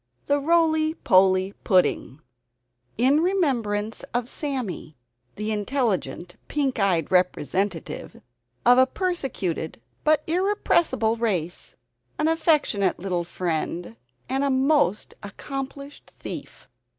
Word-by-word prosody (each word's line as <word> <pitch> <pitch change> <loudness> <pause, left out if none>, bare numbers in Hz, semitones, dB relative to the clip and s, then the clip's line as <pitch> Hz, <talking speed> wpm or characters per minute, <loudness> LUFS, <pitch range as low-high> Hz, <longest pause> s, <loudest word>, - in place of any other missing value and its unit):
THE 285 0 +2
ROLY 315 0 +2
POLY 190 - +3
PUDDING 180 -6 +1 0.8
[In 265 +6 +4
Remembrance 235 - 0
of 245 -1 0
"Sammy," 250 - -4 0.4
the 210 +1 -3
Intelligent 210 -5 -2
Pink 275 -5 -1
Eyed 180 -6 +1
Representative 185 +1 -1 0.5
of 245 +1 +7
a 260 - +6
Persecuted 265 - -3 0.2
(But 305 -1 +3
Irrepressible) 340 - +1
Race. 185 -7 -2 0.4
An 305 - +1
Affectionate 305 - +2
Little 180 -1 -2
Friend, 170 -5 -3 0.3
and 265 0 +1
Most 215 - +2
Accomplished 275 +6 -7
Thief! - - -8
235 Hz, 95 wpm, -24 LUFS, 185-295 Hz, 0.8 s, of